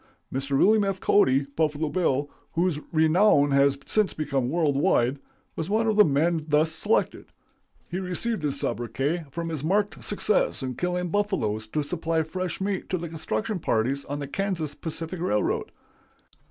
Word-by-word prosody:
Mr. 135 +1 -1
William 215 +6 +5
F. 195 -1 -1
Cody 135 -10 +3
('Buffalo 150 +2 -1
Bill'), 145 -5 +1 0.3
whose 170 -2 +1
renown 160 -2 +4
has 140 0 +4
since 215 -2 +1
become 140 -5 -1
world 155 -2 +1
wide, 135 -1 +2 0.4
was 160 +2 -4
one 220 +2 +2
of 220 -1 +1
the 210 - +8
men 160 +2 +1
thus 155 +1 +3
selected. 205 +7 0 0.6
He 180 - -3
received 190 +3 -2
his 140 -2 -1
sobriquet 135 +8 -2
from 165 +4 -4
his 155 -4 -4
marked 200 +5 0
success 205 -7 +1
in 130 -1 -3
killing 180 +4 -2
buffaloes 165 - -1
to 150 +7 -1
supply 160 +2 -1
fresh 185 +2 -4
meat 195 -1 -2
to 185 - 0
the 170 -1 -5
construction 160 - -3
parties 135 +1 0
on 145 - -4
the 145 -1 -5
Kansas 170 -3 -2
Pacific 165 +3 -5
Railway. 105 -12 +1
160 Hz, 160 wpm, -26 LUFS, 140-185 Hz, 0.6 s, the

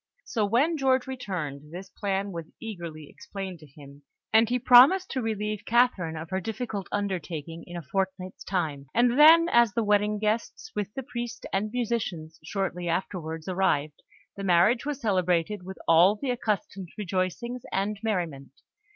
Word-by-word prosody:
So 215 -5 0
when 280 +10 +2
George 265 -2 +2
returned, 165 - -5
this 185 +2 -9
plan 200 -1 -2
was 165 -3 -7
eagerly 170 -8 -7
explained 190 0 -8
to 155 - -14
him, 140 0 -15 0.3
and 220 0 +5
he 250 - +2
promised 255 +10 +6
to 260 - -1
relieve 210 -2 -3
Catherine 225 -9 +2
of 160 +1 -8
her 190 0 -1
difficult 220 -2 -4
undertaking 170 -5 -4
in 175 0 -7
a 170 - -6
fortnight's 185 +4 -3
time; 155 -7 -2
and 245 +3 +3
then, 330 +2 +8
as 235 -3 +4
the 230 - +1
wedding 210 0 +2
guests, 220 - -2
with 205 -1 -2
the 270 - -4
priest 240 -1 -6
and 205 +2 0
musicians, 205 -10 -3
shortly 180 0 -3
afterwards 165 -2 -3
arrived, 155 -6 0 0.3
the 200 - -6
marriage 195 +9 +3
was 290 -2 -3
celebrated 185 - 0
with 190 +1 -9
all 170 +5 +6
the 255 +4 -2
accustomed 205 -6 -3
rejoicings 205 +5 -2
and 200 +1 -1
merriment. 170 -11 -3
195 Hz, 160 wpm, -27 LUFS, 170-235 Hz, 0.3 s, then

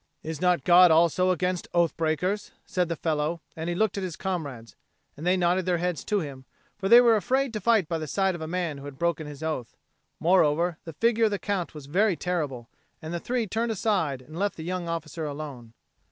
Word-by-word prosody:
"Is 160 -1 -5
not 180 -5 +2
God 180 0 +7
also 170 +3 +4
against 180 0 0
oath 170 -2 +3
breakers?" 175 +6 -1 0.2
said 180 -2 -1
the 170 - -1
fellow, 155 +1 -1 0.2
and 160 +1 -4
he 175 - -1
looked 210 +1 +1
at - - -4
his 180 -4 -4
comrades. 145 -12 -5 0.4
And 160 +4 -5
they 185 +1 +4
nodded 180 +1 +1
their 180 -1 +2
heads 175 -1 -2
to 205 -2 +1
him; 135 -4 -8 0.3
for 195 -1 -3
they 235 - +10
were 235 -2 +6
afraid 260 +5 0
to 215 - -3
fight 225 -8 +3
by 165 -1 -2
the 155 - -5
side 195 +3 +1
of 175 - -7
a 160 - -4
man 170 -4 -2
who 140 - -10
had 140 -2 -9
broken 170 -2 -1
his 150 +1 -9
oath. 155 -7 -4 0.4
Moreover 170 -1 +3
the 165 - -7
figure 230 +6 +2
of - - +3
the 205 - 0
Count 190 -6 -3
was 150 -2 -9
very 190 +7 +2
terrible; 150 -10 -3 0.3
and 160 +2 -7
the 170 - -2
three 240 +4 -1
turned 225 +3 -1
aside 180 - 0
and 155 +5 -9
left 200 +1 0
the 160 - -7
young 175 0 -3
officer 165 -1 -4
alone. 140 -6 -7
170 Hz, 225 wpm, -26 LUFS, 155-190 Hz, 0.4 s, they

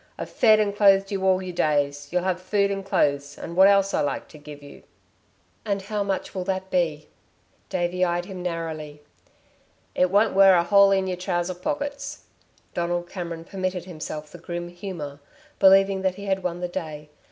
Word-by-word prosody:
"I've - - -6
fed 215 -2 +5
and 205 -1 0
clothed 195 -1 +4
you 195 -1 -2
all 190 0 +3
your 180 -1 -6
days. 145 -3 0
You'll 180 0 0
have 185 -1 -1
food 200 +2 +1
and 195 0 -3
clothes 145 -5 0
and 170 - -7
what 190 +2 +7
else 195 -1 +3
I - - +2
like 145 - -2
to 155 - -13
give 145 -1 -11
you." 145 - -13 0.8
"And 200 -2 -1
how 210 +1 -3
much 195 -1 -2
will 185 -2 -3
that 190 0 -3
be?" 160 -4 0 0.6
Davey 180 0 -1
eyed 175 0 0
him 185 -1 -8
narrowly. 160 -4 -5 0.9
"It 180 - +2
won't 205 +3 +3
wear 195 -1 +7
a 170 - +3
hole 200 +2 +6
in 195 -1 +2
y'r 185 -1 -3
trousers 180 -1 -2
pockets." 285 +4 -4 0.5
Donald 175 0 -2
Cameron 170 -3 -5
permitted 185 -1 -4
himself 155 -3 -7
the 175 - -11
grim 175 +1 -5
humour, 175 -6 -7 0.4
believing 195 0 +5
that 190 -1 0
he 200 +1 -8
had 190 -1 0
won 175 -1 -3
the 180 - -1
day. 155 -4 -6
180 Hz, 185 wpm, -24 LUFS, 170-195 Hz, 0.9 s, what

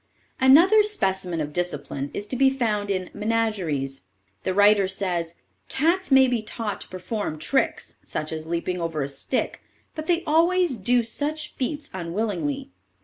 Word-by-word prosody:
_ - - -45 0.4
Another 340 +11 +7
specimen 190 - -1
of 150 0 -4
discipline 145 -5 -3
is 205 - -5
to - - -2
be 265 +1 +5
found 215 -6 -1
in 185 -2 -2
"Menageries." 205 -11 -1 0.4
The - - -1
writer 205 0 +5
says: 175 -3 -2 0.3
"Cats 335 +6 +1
may 265 -1 +7
be 245 -3 0
taught 215 -1 -5
to - - -8
perform 185 -2 -4
tricks, 265 - -1
such 155 - -4
as 160 0 -5
leaping 170 +2 -2
over 165 -3 -2
a - - -2
stick, 140 - -2 0.3
but 310 -1 -6
they 350 -1 +2
always 335 -1 +2
do 240 +4 +2
such 295 +6 -3
feats 295 +3 -4
unwillingly. 175 - -3
205 Hz, 155 wpm, -24 LUFS, 170-270 Hz, 0.4 s, Another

